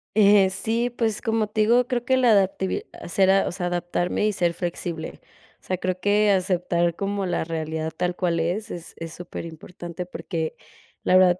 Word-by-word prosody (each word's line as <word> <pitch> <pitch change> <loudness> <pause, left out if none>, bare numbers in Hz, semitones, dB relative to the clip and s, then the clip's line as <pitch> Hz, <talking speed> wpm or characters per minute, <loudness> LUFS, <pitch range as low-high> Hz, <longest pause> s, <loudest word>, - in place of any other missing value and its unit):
Eh, 200 -2 +6
sí, 225 +5 -1
pues 225 -3 -1
como 225 -2 +1
te 215 +1 -1
digo, 240 +3 +4
creo 245 -2 -1
que 260 +1 +2
la 245 -3 +5
adaptabili 190 -2 +2 0.2
sera 190 +2 +3
o - - -2
sea, 180 0 -3
era 175 0 0
adaptarme 175 +3 -1
y 210 - +1
ser 175 -2 +1
flexible. 170 -2 -4 0.4
O - - -37
sea, 185 - -2
creo 185 0 -2
que 205 +1 +3
aceptar 175 -2 +1
como 200 -1 -2
la 175 - 0
realidad 160 -1 -3
tal 180 +1 -1
cual 170 -2 0
es, 195 +7 -1
es 170 -1 -8
es 165 -1 -7
superimportante, 175 0 -7
porque 165 -3 -4 0.5
la 185 - +3
verdad 180 -1 +6
185 Hz, 185 wpm, -24 LUFS, 175-210 Hz, 0.5 s, Eh